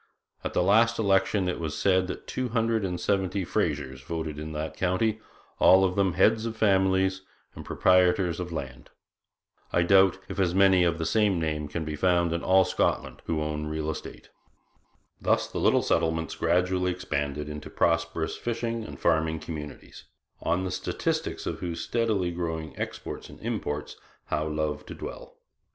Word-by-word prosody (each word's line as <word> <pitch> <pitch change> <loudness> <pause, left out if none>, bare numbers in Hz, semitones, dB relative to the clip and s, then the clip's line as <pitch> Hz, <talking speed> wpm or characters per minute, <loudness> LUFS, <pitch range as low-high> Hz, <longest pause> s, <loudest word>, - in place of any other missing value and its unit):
At - - -3
the - - +2
last 115 +5 +4
election 95 -2 +2
it 90 - -2
was 80 -3 -3
said 95 -1 +2
that - - -6
two 130 -1 -3
hundred 115 -1 +1
and 90 -2 -2
seventy 95 0 0
Frasers 70 -10 -2
voted 80 -1 -4
in 80 +1 -6
that 75 +1 -4
county 100 +4 0 0.4
all 95 +1 +7
of 90 -1 +1
them 95 -3 +2
heads 110 +5 +3
of 110 -1 -6
families 95 -2 +2 0.3
and - - -9
proprietors 90 -1 +3
of 90 -1 -4
land. 65 -6 -6 0.8
I 85 - +3
doubt 95 +1 +5
if - - -6
as 90 -2 +1
many 95 -2 +5
of 85 -2 +1
the 80 - -2
same 105 -3 +2
name 75 -2 -2
can 80 +2 -4
be 75 -1 -3
found 85 +1 +2
in 85 - -1
all 95 0 +4
Scotland - - -1
who 80 -2 0
own 75 0 -3
real 80 0 -2
estate.' 75 - -9 0.9
Thus - - +2
the - - -5
little - - +3
settlements 80 0 0
gradually 90 +2 +1
expanded 75 -5 -3
into 75 0 -7
prosperous 85 -1 0
fishing 115 -1 -3
and - - -9
farming 80 -1 +1
communities, 75 -3 -8 0.4
on 90 +2 0
the 95 - -3
statistics - - -2
of - - -3
whose 85 -2 -4
steadily 110 -7 0
growing 80 -2 -4
exports - - -6
and - - -13
imports 75 0 -3 0.3
Howe 75 +1 0
loved 75 -1 -2
to - - -7
dwell. - - -9
90 Hz, 170 wpm, -27 LUFS, 80-95 Hz, 0.9 s, all